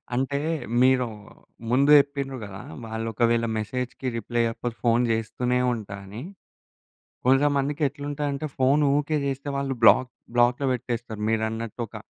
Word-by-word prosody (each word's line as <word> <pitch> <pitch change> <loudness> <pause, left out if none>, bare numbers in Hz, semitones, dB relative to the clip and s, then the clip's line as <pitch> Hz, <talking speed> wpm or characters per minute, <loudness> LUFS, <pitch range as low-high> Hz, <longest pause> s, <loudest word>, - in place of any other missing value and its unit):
అంటే, 135 +2 0 0.4
మీరు 130 -1 +4 0.6
ముందు 140 +3 +4
జెప్పిండ్రు 140 -2 0
గదా! 95 -1 -9 0.2
వాళ్ళు 110 0 -4
ఒకవేళ 115 +1 +2
మెసేజ్‌కి 125 +4 -4
రిప్లై 120 +2 -1
ఇయ్యకపోతే 115 +1 -3
ఫోన్ 120 +1 +4
జేస్తూనే 125 +3 0
ఉంటా 105 -3 -6
అని. 105 +5 -8 1.1
కొంచం 135 +3 +4
మందికెట్లుంటదంటే 145 0 -2
ఫోన్ 135 +3 +4 0.2
ఊకే 150 +1 0
చేస్తే 140 +1 -3
వాళ్ళు 135 -1 -1
బ్లాక్ 125 +3 +6 0.3
బ్లాక్‌లో 120 +3 +3
పెట్టేస్తారు 120 -3 -4
మీరన్నట్టు 110 +1 -2
ఒక 110 - -11
125 Hz, 125 wpm, -25 LUFS, 115-140 Hz, 1.1 s, బ్లాక్